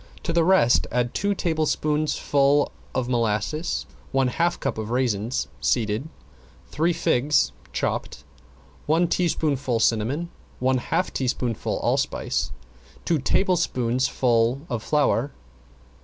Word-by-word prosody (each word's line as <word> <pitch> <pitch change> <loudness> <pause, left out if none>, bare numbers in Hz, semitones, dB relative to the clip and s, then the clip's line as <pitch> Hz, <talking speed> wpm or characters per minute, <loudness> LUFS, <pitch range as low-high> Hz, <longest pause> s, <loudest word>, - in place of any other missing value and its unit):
To 165 - -2
the 170 -1 +3
rest 165 -9 +4
add 120 0 0
two 200 0 0
tablespoonfuls 150 -3 +1 0.2
of 130 -2 0
molasses, 120 +6 -1 0.3
one 135 -1 +2
half 170 +7 0
cup - - -2
of 110 0 -4
raisins 120 -2 0
(seeded), 115 +4 0 0.6
three 165 +4 +1
figs 150 -2 +2 0.2
(chopped), - - -3 0.6
one 165 +3 +3
teaspoonful 145 -8 0
cinnamon, 120 +10 0 0.3
one 130 0 +1
half - - -1
teaspoonful 125 -3 -1
allspice, - - 0 0.5
two 165 -3 +2
tablespoonfuls 130 -6 +1
of 120 -3 -1
flour. 145 -1 +1
135 Hz, 105 wpm, -24 LUFS, 120-155 Hz, 0.6 s, rest